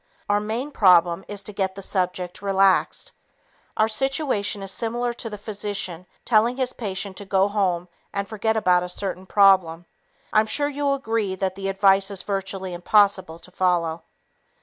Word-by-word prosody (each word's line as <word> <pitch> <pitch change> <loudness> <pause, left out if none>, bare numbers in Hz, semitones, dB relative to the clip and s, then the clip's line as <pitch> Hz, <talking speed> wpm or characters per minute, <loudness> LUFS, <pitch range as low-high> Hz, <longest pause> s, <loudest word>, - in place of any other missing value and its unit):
Our 205 0 +2
main 225 +7 -3
problem 180 -5 +4
is 205 -1 -5
to 210 - -5
get 190 -1 -2
the 195 - -8
subject 180 -2 -2
relaxed. 195 -1 +2 0.7
Our 215 - +4
situation 225 -4 -1
is 195 - -4
similar 240 +3 -2
to 235 -1 -6
the 210 - -7
physician 200 -4 -4 0.2
telling 235 +2 +3
his 255 -1 -1
patient 195 -3 -5
to 200 - -6
go 195 0 +2
home 185 -4 0 0.2
and 200 0 -3
forget 220 +1 -1
about 180 -4 +3
a 180 - -5
certain 185 0 -4
problem. 185 -5 +4 0.5
I'm 215 0 +4
sure 290 +5 0
you'll 285 -1 0
agree 225 -7 -2
that 190 0 -2
the 195 0 -4
advice 195 0 +3
is 195 -2 -4
virtually 195 -2 -3
impossible 190 -1 +2
to 175 +2 -15
follow. 170 -3 0
195 Hz, 165 wpm, -23 LUFS, 185-215 Hz, 0.7 s, problem